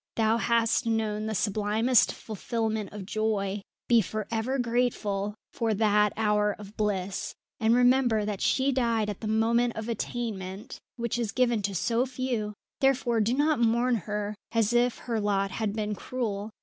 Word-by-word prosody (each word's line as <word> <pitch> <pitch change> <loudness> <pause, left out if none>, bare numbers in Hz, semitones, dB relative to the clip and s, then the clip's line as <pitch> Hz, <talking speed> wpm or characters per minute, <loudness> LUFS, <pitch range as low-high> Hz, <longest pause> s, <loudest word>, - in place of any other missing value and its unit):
Thou 225 0 +3
hast 230 +2 +2
known 215 -1 0
the 220 - -2
sublimest 215 +5 +2
fulfilment 220 -1 -3
of 205 -2 -7
joy. 210 -1 -1 0.3
Be 235 -2 +5
for 215 +1 -4
ever 235 +4 -1
grateful 230 -5 0 0.2
for 225 -2 0
that 210 -1 +3
hour 210 -1 +2
of 210 0 -11
bliss, 200 -2 -2 0.2
and 225 +1 +3
remember 245 -3 +3
that 205 -2 -3
she 270 +1 +2
died 230 -5 +1
at 200 - -9
the 220 - -3
moment 230 +2 +2
of 220 0 -5
attainment, 215 -4 -4 0.2
which 235 0 -2
is 225 -4 -1
given 240 -4 +2
to 200 0 -2
so 230 +9 +1
few; 245 -5 -3 0.2
therefore 250 -4 +2
do 230 +4 +1
not 300 0 +2
mourn 235 0 +2 0.5
as 230 0 +2
if 240 0 +2
her 230 -2 -3
lot 195 -1 0
had 215 0 -1
been 210 -1 -2
cruel. 210 -2 -3
220 Hz, 160 wpm, -28 LUFS, 210-235 Hz, 0.5 s, Be